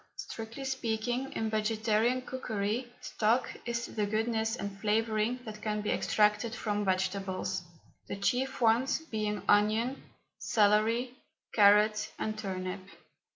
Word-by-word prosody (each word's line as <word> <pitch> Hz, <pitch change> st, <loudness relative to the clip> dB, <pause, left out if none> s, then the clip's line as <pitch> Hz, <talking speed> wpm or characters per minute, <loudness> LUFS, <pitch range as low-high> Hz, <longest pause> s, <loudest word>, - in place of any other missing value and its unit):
Strictly 225 Hz, +4 st, -7 dB
speaking, 245 Hz, 0 st, -2 dB
in 220 Hz, -1 st, -2 dB
vegetarian 220 Hz, +3 st, +1 dB
cookery, 240 Hz, -1 st, -3 dB
stock 230 Hz, +4 st, +1 dB, 0.2 s
is 235 Hz, 0 st, -1 dB
the 210 Hz, -2 st, -2 dB
goodness 220 Hz, +1 st, 0 dB
and 200 Hz, -3 st, -6 dB
flavouring 220 Hz, +2 st, +1 dB
that 215 Hz, -1 st, -8 dB
can 210 Hz, -1 st, -1 dB
be 210 Hz, -, -1 dB
extracted 210 Hz, +2 st, +2 dB
from 210 Hz, -3 st, -1 dB
vegetables, 190 Hz, -1 st, -1 dB, 0.5 s
the -, -, -4 dB
chief 250 Hz, +7 st, -1 dB
ones 235 Hz, +3 st, +3 dB
being 215 Hz, -, -3 dB
onion, 220 Hz, +5 st, +3 dB, 0.4 s
celery, 220 Hz, +4 st, +2 dB, 0.4 s
carrot, 210 Hz, 0 st, +5 dB
and 215 Hz, 0 st, -2 dB
turnip. 185 Hz, -2 st, -4 dB
215 Hz, 115 wpm, -31 LUFS, 210-235 Hz, 0.5 s, carrot